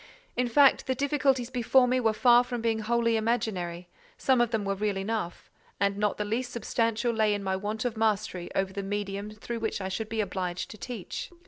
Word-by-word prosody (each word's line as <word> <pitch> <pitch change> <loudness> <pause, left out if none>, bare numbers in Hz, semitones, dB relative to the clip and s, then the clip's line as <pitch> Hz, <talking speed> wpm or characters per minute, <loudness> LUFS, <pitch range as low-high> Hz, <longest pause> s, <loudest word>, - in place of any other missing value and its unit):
In 250 0 +1
fact, 275 +3 +5
the 260 - +1
difficulties 270 -2 +1
before 250 +1 +4
me 255 +1 +2
were 225 -3 +3
far 240 +2 +5
from 245 -1 -4
being 225 -1 0
wholly 230 +1 +1
imaginary; 190 -7 -1 0.3
some 260 -2 +3
of 240 - +2
them 220 -3 -1
were 195 - 0
real 205 0 -1
enough; 195 -3 -4 0.3
and 200 0 +2
not 205 0 0
the 210 - -2
least 240 +4 -2
substantial 230 0 0
lay 215 -2 +2
in 200 - -4
my 190 -1 0
want 210 +4 -3
of 240 -2 -1
mastery 215 -5 0
over 190 0 0
the 200 - -3
medium 200 0 -3
through 215 +2 -6
which 220 -2 -2
I 190 -1 -3
should 215 +3 -3
be 225 -1 -3
obliged 185 -3 -3
to 215 - -10
teach. 235 -8 -6
220 Hz, 210 wpm, -28 LUFS, 200-240 Hz, 0.3 s, fact